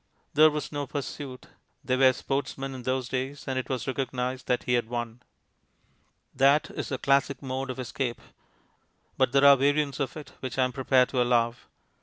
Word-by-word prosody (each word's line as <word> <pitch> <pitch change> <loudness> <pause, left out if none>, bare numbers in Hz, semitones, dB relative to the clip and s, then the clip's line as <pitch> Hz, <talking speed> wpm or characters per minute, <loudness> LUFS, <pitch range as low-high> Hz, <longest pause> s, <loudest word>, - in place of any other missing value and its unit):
There 155 +1 +7
was 150 0 -4
no 145 -2 -3
pursuit; 140 -2 -6 0.4
they 130 - +1
were 130 0 +6
sportsmen 135 +1 -3
in 130 - -7
those 130 0 -1
days, 135 +3 -4
and 130 -1 -1
it 130 - -6
was 130 -2 -2
recognized 130 -1 -3
that 125 - +1
he 125 - 0
had 120 -2 +1
won. 120 0 -4 1.1
That 140 +3 +3
is - - -5
the 130 - -2
classic 140 +1 +1
mode 130 0 -3
of 130 - -4
escape. 130 -1 -3 1.0
But - - +2
there 140 +1 +4
are 140 0 +9
variants 140 +1 +1
of 135 +1 -3
it 150 - -9
which 130 -2 -5
I 130 - +4
am 125 0 -1
prepared 130 -1 +3
to 125 - 0
allow. 120 -1 +2
130 Hz, 185 wpm, -27 LUFS, 125-140 Hz, 1.1 s, are